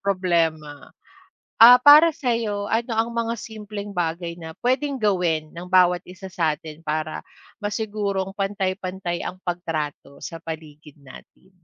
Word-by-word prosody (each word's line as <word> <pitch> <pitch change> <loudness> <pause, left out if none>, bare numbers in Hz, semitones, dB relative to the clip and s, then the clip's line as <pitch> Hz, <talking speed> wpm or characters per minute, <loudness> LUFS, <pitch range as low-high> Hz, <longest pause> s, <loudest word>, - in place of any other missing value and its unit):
problema. 165 -6 -1 0.7
Ah, 245 +2 +10
para 305 +3 +8
sa'yo 225 -5 -2
ano 230 +1 0
ang 225 +1 0
mga 230 0 -2
simpleng 210 -2 -8
bagay 170 0 -2
na 160 -1 -9
pwedeng 265 +2 0
gawin 170 -6 +1
ng 170 +3 -9
bawat 180 -1 +4
isa 185 +1 -10
sa'tin 160 -1 -3
para 155 +1 -3 0.4
masigurong 205 -2 -2
pantay-pantay 190 -3 -3
ang 185 +1 -7
pagtrato 155 -5 -4
sa 165 - -6
paligid 155 -2 -10
natin? 140 +7 -16
185 Hz, 125 wpm, -23 LUFS, 165-210 Hz, 0.7 s, Ah